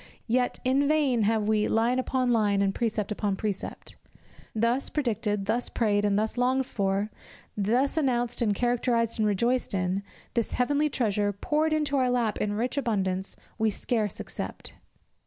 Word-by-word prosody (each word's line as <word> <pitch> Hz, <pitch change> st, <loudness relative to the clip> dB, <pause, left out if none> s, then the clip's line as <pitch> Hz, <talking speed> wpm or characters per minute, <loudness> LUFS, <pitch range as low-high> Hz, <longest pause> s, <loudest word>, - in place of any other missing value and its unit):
Yet, 245 Hz, +1 st, 0 dB
in 270 Hz, +2 st, +2 dB
vain 285 Hz, -6 st, +2 dB
have 220 Hz, -2 st, +1 dB
we 215 Hz, -1 st, +2 dB
"line 235 Hz, +3 st, +2 dB
upon 255 Hz, -1 st, 0 dB
line 205 Hz, -3 st, +3 dB
and 195 Hz, 0 st, +1 dB
precept 215 Hz, -2 st, -1 dB
upon 205 Hz, -1 st, -1 dB
precept." 205 Hz, -1 st, -5 dB, 0.6 s
Thus 235 Hz, +5 st, +1 dB
predicted, 215 Hz, -7 st, -1 dB
thus 240 Hz, +4 st, -1 dB
prayed 205 Hz, -3 st, +1 dB
and 205 Hz, -1 st, +2 dB, 0.2 s
longed 255 Hz, +2 st, +2 dB
for, 200 Hz, -1 st, -1 dB, 0.4 s
thus 240 Hz, +9 st, +1 dB
announced 245 Hz, -5 st, +1 dB
and 210 Hz, -3 st, +2 dB
characterized 235 Hz, -1 st, +1 dB
and 215 Hz, -, +3 dB
rejoiced 235 Hz, +3 st, +1 dB
in, 185 Hz, +1 st, 0 dB, 0.3 s
this 235 Hz, -2 st, -1 dB
heavenly 290 Hz, +4 st, +2 dB
treasure 210 Hz, -6 st, 0 dB
poured 300 Hz, +10 st, 0 dB
into 300 Hz, -2 st, +1 dB
our 255 Hz, -1 st, +2 dB
lap 240 Hz, -4 st, 0 dB
in 205 Hz, -, 0 dB
rich 240 Hz, +6 st, -2 dB
abundance 190 Hz, -6 st, -1 dB, 0.2 s
we 220 Hz, 0 st, +3 dB
scarce 215 Hz, 0 st, -2 dB
accept. -, -, -6 dB
230 Hz, 155 wpm, -27 LUFS, 205-255 Hz, 0.6 s, line